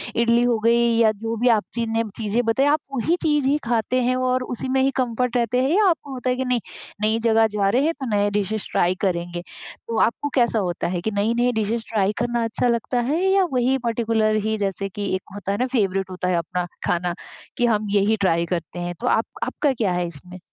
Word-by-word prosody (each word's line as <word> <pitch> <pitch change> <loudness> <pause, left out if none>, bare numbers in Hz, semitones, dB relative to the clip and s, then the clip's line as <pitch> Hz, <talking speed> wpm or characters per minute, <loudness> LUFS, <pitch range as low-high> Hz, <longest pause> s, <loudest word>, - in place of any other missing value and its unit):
इडली 235 0 +3
हो 240 -2 +2
गई 230 +2 +3 0.2
या 225 -2 +5
जो 225 +2 -4
भी 250 - +3
आप 205 - -3
ची 235 0 -1
नेम 225 -1 0
चीज़ें 225 +2 0
बताई 245 +5 +2
आप 300 +2 +3
वही 295 +7 +1
चीज़ 295 -4 +1
ही 285 +2 +3
खाते 240 +2 +1
हैं 255 +1 +1
और 255 0 0
उसी 250 +1 -4
में 265 0 +2
ही 270 - +2
कम्फर्ट 250 0 0
रहते 240 +2 +1
हैं 265 - +1
या 425 - +4
आपको 290 -4 -2
होता 255 0 -3
है 250 - +2
कि 260 +1 -2
नहीं, 250 -1 +1 0.4
नई 220 +1 +2
जगह 225 -1 +4
जा 205 -2 0
रहे 250 +7 +2
हैं 330 - +1
तो 265 - -4
नए 205 0 +2
डिशेज 210 +1 -2
ट्राई 180 +1 +2
करेंगे? 175 -2 -1 0.5
तो 230 - -2
आपको 290 +5 +1
कैसा 235 -4 +3
होता 175 -4 -2
है 175 -1 -2
कि 220 +4 -2
नई-नई 235 +4 +1
डिशेज 220 +1 -2
ट्राई 205 -2 +1
करना 240 0 0
अच्छा 225 +2 0
लगता 235 +1 0
है 315 +6 0
या 385 0 +4
वही 255 +1 +2
पर्टिकुलर 225 -2 +1
ही 220 0 0
जैसे 195 -1 -2
कि 205 +1 -5
एक 190 - -3
होता 200 -1 -4
है 200 - -1
ना 250 - +1
फेवरेट 195 -5 0
होता 180 0 -4
है 180 - +1
अपना 175 +2 -2 0.2
खाना 175 0 0 0.4
कि 245 - +2
हम 215 -2 +1
यही 205 +2 +3
ट्राई 170 -3 +2
करते 170 0 -4
हैं, 175 0 -4
तो - - -3
आप 225 - +2 0.2
आपका 290 -3 0
क्या 220 -6 0
है 175 0 -1
इसमें? 180 +3 -11
225 Hz, 235 wpm, -22 LUFS, 200-250 Hz, 0.5 s, या